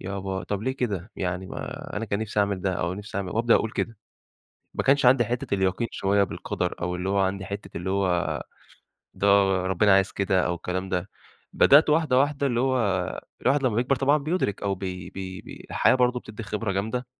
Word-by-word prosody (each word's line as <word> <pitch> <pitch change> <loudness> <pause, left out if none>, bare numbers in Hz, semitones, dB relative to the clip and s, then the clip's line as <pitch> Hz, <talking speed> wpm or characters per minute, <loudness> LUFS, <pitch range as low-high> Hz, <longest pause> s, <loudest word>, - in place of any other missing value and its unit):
يابا 95 0 -4
طَب 100 0 -3
ليه 130 +3 0
كده؟ 105 -6 -3
يعني 90 0 -3
م - - -8
أنا 105 - -5
كان 100 -2 -2
نفْسي 110 -1 -1
أعمل 100 -2 0
ده 95 0 0
أو 85 0 -2
نفْسي 105 0 -8
أعمل 95 -2 -3
وأبدأ 115 +1 +3
أقول 110 - +1
كده، 115 +1 -3 0.8
ما - - -1
كانش 140 -1 +3
عندي 125 -1 +6
حتّة 120 0 -2
اليقين 95 +4 0
شويّة 100 +1 +1
بالقدر 90 -2 -3
أو 90 +1 -1
اللي 90 +1 -3
هو 100 +1 +1
عندي 95 0 0
حتّة 100 -1 -7
اللي 90 +2 -3
هو 95 -3 0 0.7
ده 100 - -1 0.4
ربنا 95 +2 +4
عايز 95 0 +3
كده 95 -2 +1
أو 90 - 0
الكلام 90 +2 -4
ده. 95 +1 -2 0.4
بدأت 150 +2 +6
واحدة 150 -4 +3
واحدة 140 +1 +1
اللي 120 -3 +1
هو 130 0 +2 0.7
الواحد 135 +2 +2
لمّا 125 -5 +1
بيكبر 125 +3 +2
طبعًا 140 +3 +3
بيُدرك 155 - -1
أو 100 -1 0
بي 90 -2 -6
بي 95 -1 -7
بي - - -12
الحياة - - +4
برضه 125 -1 +2
بتدِّي 110 0 -9
خبرة 105 -1 -3
جامدة، 110 +6 -2
100 Hz, 200 wpm, -25 LUFS, 95-125 Hz, 0.8 s, عندي